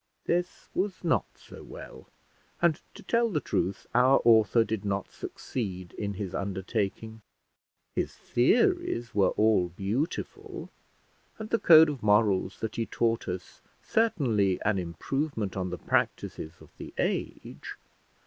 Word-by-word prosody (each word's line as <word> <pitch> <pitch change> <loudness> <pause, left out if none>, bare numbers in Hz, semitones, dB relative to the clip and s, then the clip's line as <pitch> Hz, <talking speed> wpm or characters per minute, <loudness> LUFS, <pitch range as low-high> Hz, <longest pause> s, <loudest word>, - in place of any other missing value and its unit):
This 175 +1 -1
was 190 0 -2
not 165 - +2
so - - -13
well; - - -11 0.5
and, 170 -2 +2
to - - -11
tell 235 0 +2
the 165 -8 0
truth, 95 -8 -2
our 125 +3 +5
author 115 0 +5
did 110 -2 -3
not 100 -1 -2
succeed 95 -7 -5
in 100 -1 -4
his 95 -1 -5
undertaking. 100 +3 -3 0.7
His - - -2
theories 230 - +1
were 100 -2 +4
all 105 -5 +3
beautiful, 100 - -4 0.7
and 220 0 -7
the 230 - +2
code 160 -1 +8
of 145 -5 -4
morals 105 -2 +2
that 110 -1 -4
he 115 -1 -1
taught 115 -1 0
us 90 -1 -6 0.2
certainly 120 - +1
an 105 -2 +1
improvement 105 - -3
on 95 -1 -2
the 90 - -4
practices 80 -1 -2
of - - -17
the - - -9
age. - - -3
110 Hz, 135 wpm, -28 LUFS, 95-150 Hz, 0.7 s, code